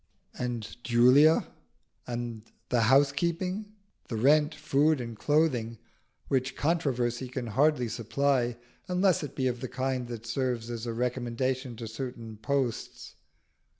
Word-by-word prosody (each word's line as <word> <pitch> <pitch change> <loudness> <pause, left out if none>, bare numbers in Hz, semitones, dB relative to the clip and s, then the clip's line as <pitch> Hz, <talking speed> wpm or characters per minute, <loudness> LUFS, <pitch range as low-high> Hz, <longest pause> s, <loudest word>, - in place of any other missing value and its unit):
And 120 -1 -5
Julia? 125 +6 +5 0.6
And 120 -2 -4 0.3
the 120 -2 +2
housekeeping? 170 +9 +2 0.4
the 115 - -4
rent, 150 +6 +4
food, 150 +2 +2
and 115 -2 -5
clothing, 125 -5 +1 0.5
which 135 -1 0
controversy 130 -6 0
can 125 0 -4
hardly 130 +2 +2
supply 120 +2 0 0.3
unless 180 0 +2
it 145 - -6
be 130 - -1
of 125 -1 -1
the 130 - -4
kind 130 -1 -2
that 115 -2 -7
serves 120 -1 -2
as 120 0 -5
a 115 - -2
recommendation 125 +1 -2
to 115 0 -6
certain 115 -1 -6
posts. 125 +1 -2
125 Hz, 125 wpm, -29 LUFS, 120-140 Hz, 0.6 s, Julia